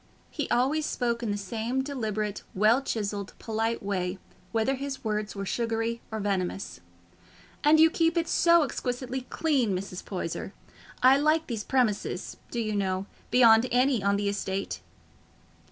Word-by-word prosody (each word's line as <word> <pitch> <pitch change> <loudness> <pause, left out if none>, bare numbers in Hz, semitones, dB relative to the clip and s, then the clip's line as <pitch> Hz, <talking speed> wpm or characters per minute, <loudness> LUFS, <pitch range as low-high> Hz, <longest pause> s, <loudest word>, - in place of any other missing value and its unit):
He 295 - -3
always 285 +5 +2
spoke 235 -2 -1
in 230 - -2
the 205 - -1
same 225 +6 -2
deliberate, 215 -7 -3
well 215 +6 +4
chiselled, 205 -5 -3
polite 225 0 -2
way, 185 -2 -2 0.3
whether 225 +5 +1
his 275 0 -5
words 210 -1 -2
were 195 0 -4
sugary 230 +1 -1
or 220 - -3
venomous. 195 -1 -2 0.8
"And 305 +1 +6
you 320 0 +7
keep 330 0 +2
it 330 -1 +1
so 340 -1 +5
exquisitely 255 -1 -3
clean, 260 - +1
Mrs. 185 -1 -6
Poyser. 185 0 -4 0.5
I 260 +2 +7
like 310 +2 +2
these 225 -4 -4
premises, 215 -8 0
do 240 - -3
you 215 -2 -1
know, 190 -1 -1 0.2
beyond 230 -1 +6
any 250 -2 +3
on 200 +1 +2
the 205 0 -1
estate." 195 -1 -2
225 Hz, 150 wpm, -28 LUFS, 205-265 Hz, 0.8 s, you